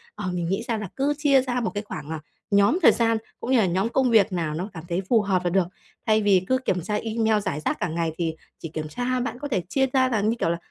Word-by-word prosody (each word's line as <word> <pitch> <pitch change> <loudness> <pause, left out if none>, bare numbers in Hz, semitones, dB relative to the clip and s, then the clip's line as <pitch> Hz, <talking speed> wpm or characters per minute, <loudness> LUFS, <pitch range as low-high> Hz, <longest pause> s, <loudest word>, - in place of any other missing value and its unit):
Ờ, 185 - -4
mình 175 -1 -2
nghĩ 195 +4 -1
ra 230 - 0
là 210 -2 -4
cứ 280 +2 +1
chia 285 -3 +4
ra 250 -1 -2
một 230 - -1
cái 205 0 -3
khoảng, 155 -8 -7
à, 160 -1 -4 0.3
nhóm 200 - +4
thời - - +8
gian 230 -1 +2 0.2
cũng 250 - -4
như 260 - +5
là 215 - +4
nhóm 190 +5 0
công 260 +1 +2
việc 215 -4 +5
nào 165 -4 -1
nó 180 +6 -4
cảm 160 -3 -8
thấy 175 +2 0
phù 230 -3 +5
hợp 190 -3 0
là 175 - +1
được. 190 0 +2 0.4
Thay 215 0 +3
vì 200 -3 +4
cứ 260 - +3
kiểm 190 -9 -1
tra 210 +5 -2
email 220 0 +1
rải 190 -7 -3
rác 150 - -2
cả 175 - 0
ngày 165 0 -1
thì 165 -2 -1 0.2
chỉ 165 - -6
kiểm 155 -1 -5
tra, 245 +9 -2
bạn 245 0 -3
có 290 - -4
thể 235 -10 0
chia 270 -1 +2
ra 260 -1 +3
là, 220 -5 +1
như 215 +3 +1
kiểu 165 - +1
là, 170 - 0
210 Hz, 290 wpm, -24 LUFS, 175-245 Hz, 0.4 s, thời